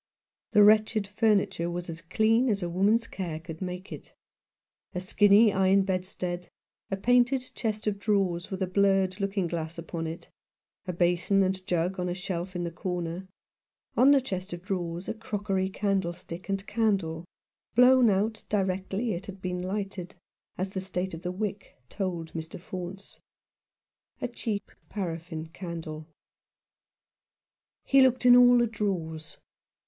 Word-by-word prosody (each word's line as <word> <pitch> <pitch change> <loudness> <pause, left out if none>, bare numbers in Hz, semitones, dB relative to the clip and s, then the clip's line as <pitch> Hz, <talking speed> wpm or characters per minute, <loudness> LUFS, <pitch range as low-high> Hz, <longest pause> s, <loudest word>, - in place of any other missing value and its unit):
The 210 - +7
wretched 215 0 +4
furniture 200 -4 +1
was 175 0 -4
as 165 -1 -6
clean 225 +8 +2
as 200 -3 0
a 175 - -2
woman's 205 +6 +3
care 170 -5 -5
could 165 +1 -9
make 180 0 -5
it; - - -10 0.8
a - - 0
skinny 205 +3 +5
iron 190 +1 +4
bed 185 -1 -1
stead; 180 -1 -5 0.4
a 195 - -1
painted 245 +4 +3
chest 215 -3 -3
of 205 -2 -1
drawers 195 -5 0
with 190 0 -2
a - - +2
blurred 195 0 +2
looking 195 -1 0
glass 165 -1 -4
upon 165 0 -4
it; 165 +1 -7 0.6
a - - 0
basin 180 +3 +2
and 185 0 -1
jug 180 +1 0
on 180 0 -1
a 175 - -2
shelf 180 0 -4
in 175 - -2
the 170 - -3
corner; 175 +1 -4 0.7
on 260 - +6
the 280 -1 +6
chest 190 -6 -5
of 175 0 -7
drawers 180 -2 -3
a - - -1
crockery 200 -3 -2
candlestick 190 -3 -3
and 195 0 -2
candle 195 -8 0 0.5
blown 250 0 +7
out 210 +3 0
directly 195 +3 -1
it 175 +3 -6
had 195 -1 -8
been 180 -1 -3
lighted, 190 -1 -4 0.4
as 190 +1 -2
the 190 - -3
state 185 -1 -3
of 165 - -6
the 180 0 -3
wick 205 +1 -5
told 175 -5 -3
Mr. 160 0 -6
Faunce 185 +2 -8 0.5
— - - -54
a - - +1
cheap 215 -4 -4 0.2
paraffin 165 -4 -5
candle. 165 -3 -7 1.8
He 275 0 +5
looked 255 -1 +3
in 245 0 +9
all 245 0 +7
the 240 - +4
drawers. 170 -8 -3
190 Hz, 155 wpm, -28 LUFS, 175-210 Hz, 1.8 s, in